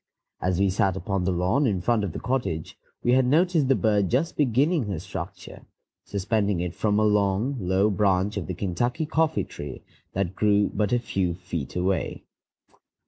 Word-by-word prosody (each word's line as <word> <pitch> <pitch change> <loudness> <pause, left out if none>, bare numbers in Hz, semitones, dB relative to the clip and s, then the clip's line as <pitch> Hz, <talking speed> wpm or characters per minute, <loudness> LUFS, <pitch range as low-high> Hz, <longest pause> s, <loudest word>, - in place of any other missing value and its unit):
As 90 0 0
we 100 -1 +3
sat 95 0 +1
upon 95 -2 -2
the 95 - +1
lawn 90 +11 +1
in 100 -5 0
front 110 +3 +1
of 100 - -2
the - - -6
cottage, 115 -11 -2 0.3
we 120 - +3
had 130 +1 +5
noticed 160 0 +3
the 135 - +4
bird 105 -5 +2
just 140 +7 0
beginning 145 +2 +2
her 100 -4 -2
structure, - - -8 0.4
suspending 100 -1 0
it 90 0 -3
from 105 +1 0
a 110 - +3
long, 105 +5 +2
low 95 +2 +2
branch 100 0 +1
of 100 - -3
the 95 - -4
Kentucky 120 - -1
coffee 160 +1 +1
tree 70 -3 -8 0.3
that 95 -1 -1
grew 105 0 +2
but 105 -1 0
a 125 - +4
few 95 -7 -1
feet 85 -6 -6
away. 95 +2 -1
100 Hz, 180 wpm, -25 LUFS, 95-120 Hz, 0.4 s, had